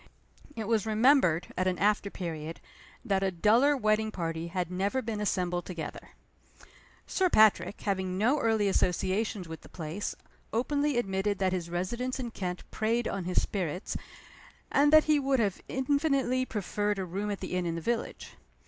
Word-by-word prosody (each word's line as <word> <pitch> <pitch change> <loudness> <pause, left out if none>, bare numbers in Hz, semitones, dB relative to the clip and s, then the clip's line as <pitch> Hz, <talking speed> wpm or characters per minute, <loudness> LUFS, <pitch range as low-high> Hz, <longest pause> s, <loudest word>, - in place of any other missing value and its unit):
It 220 -2 -4
was 225 -2 +1
remembered, 220 - +3
at 185 - 0
an 185 -1 0
after 205 0 +2
period, 165 -4 -5 0.5
that 195 -4 +1
a 195 - +2
duller 230 +11 +4
wedding 215 -2 +2
party 165 -4 -3
had 180 0 -3
never 195 +7 0
been 225 -4 -3
assembled 180 -3 -1
together. 170 -4 -7 0.9
Sir 375 -1 +1
Patrick, 215 - +4
having 190 -2 -1
no 245 +9 +3
early 220 -4 +2
associations 190 +1 0
with 160 -1 -8
the - - -15
place, 165 +4 -4 0.4
openly 285 +4 0
admitted 195 -2 0
that 190 -1 +1
his 175 -2 -3
residence 235 +10 -2
in 240 -3 -4
Kent 180 -4 -4
preyed 230 +2 0
on 195 -3 -3
his 180 - +1
spirits, 180 -2 -3 0.8
and 290 +1 +4
that 310 0 +8
he 305 -1 +3
would 270 -1 +1
have 205 -5 0
infinitely 265 -1 +1
preferred 205 0 -1
a 190 - -2
room 195 +4 -3
at 205 - -3
the 185 - -5
inn 180 -1 0
in 165 - -2
the - - -3
village. 230 +7 -3
205 Hz, 165 wpm, -29 LUFS, 180-235 Hz, 0.9 s, that